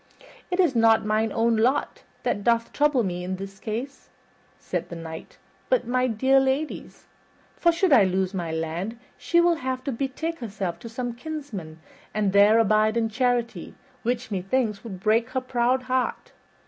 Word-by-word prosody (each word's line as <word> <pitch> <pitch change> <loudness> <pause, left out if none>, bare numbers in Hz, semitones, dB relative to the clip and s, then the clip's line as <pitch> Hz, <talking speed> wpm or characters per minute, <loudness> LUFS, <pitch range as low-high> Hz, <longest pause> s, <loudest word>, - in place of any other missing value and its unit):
"It 360 0 -2
is 340 -8 +3
not 225 -1 +4
mine 215 +1 +1
own 230 +1 +2
lot 255 +6 +1 0.2
that 205 - -1
doth 230 0 +1
trouble 290 -4 +3
me 180 -2 -3
in 185 +1 -3
that 195 +1 -9
case," 245 +6 -5 0.5
said - - -4
the 170 - -6
Knight, 160 -1 -9 0.3
"but - - +2
my 255 +1 +1
dear 260 +4 +3
lady's; 270 +3 -2 0.5
for 340 - +3
should 340 -1 +2
I 235 - +7
lose 190 0 0
my 175 -4 -3
land 165 +7 -3 0.2
she 340 - +1
will 345 -1 +4
have 260 -2 -3
to 280 - -2
betake 280 +7 -3
herself 195 -7 -4
to 230 - -9
some 245 +1 -4
kinsman 235 - -7 0.3
and 205 -2 +1
there 205 +2 +6
abide 215 0 +3
in 225 -1 +1
charity, 245 0 -1 0.3
which, 240 0 -2
methinks, 205 +2 -1
would 200 -6 -7
break 225 +4 +2
her 260 0 -2
proud 255 0 +1
heart. 255 0 -2
230 Hz, 170 wpm, -25 LUFS, 200-260 Hz, 0.5 s, I